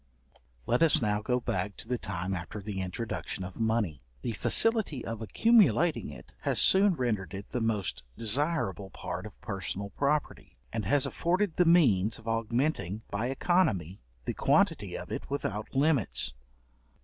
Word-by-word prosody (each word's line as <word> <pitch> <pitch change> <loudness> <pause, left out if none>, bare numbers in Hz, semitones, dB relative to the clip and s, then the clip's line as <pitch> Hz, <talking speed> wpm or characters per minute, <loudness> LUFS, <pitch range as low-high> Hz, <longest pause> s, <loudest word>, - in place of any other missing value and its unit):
Let 120 - +1
us 165 -2 +5
now 105 -2 0
go 125 +3 0
back 100 -3 -3
to - - -7
the 125 -1 -1
time 95 0 -3
after 90 +3 -5
the 100 -1 -4
introduction 95 +1 -4
of 90 0 -8
money. 110 - 0 0.2
The - - -1
facility 205 - +2
of 115 -1 -5
accumulating 195 - +3
it - - -12
has - - +2
soon 195 -1 +6
rendered 105 - -2
it 100 +1 -9
the 125 - -2
most 105 - -1 0.2
desirable 115 - 0
part 95 +2 -6
of 105 - -16
personal 100 0 -4
property, 145 +6 -2 0.2
and 110 -3 -2
has 135 +7 +3
afforded 180 +1 0
the 180 - +3
means 115 - +4
of 115 - -14
augmenting, 115 - -1
by 110 +4 -1
economy, 130 - 0 0.2
the - - -2
quantity - - +1
of - - -9
it - - -5
without 110 -5 -4
limits. 135 - +2
115 Hz, 155 wpm, -29 LUFS, 100-145 Hz, 0.2 s, soon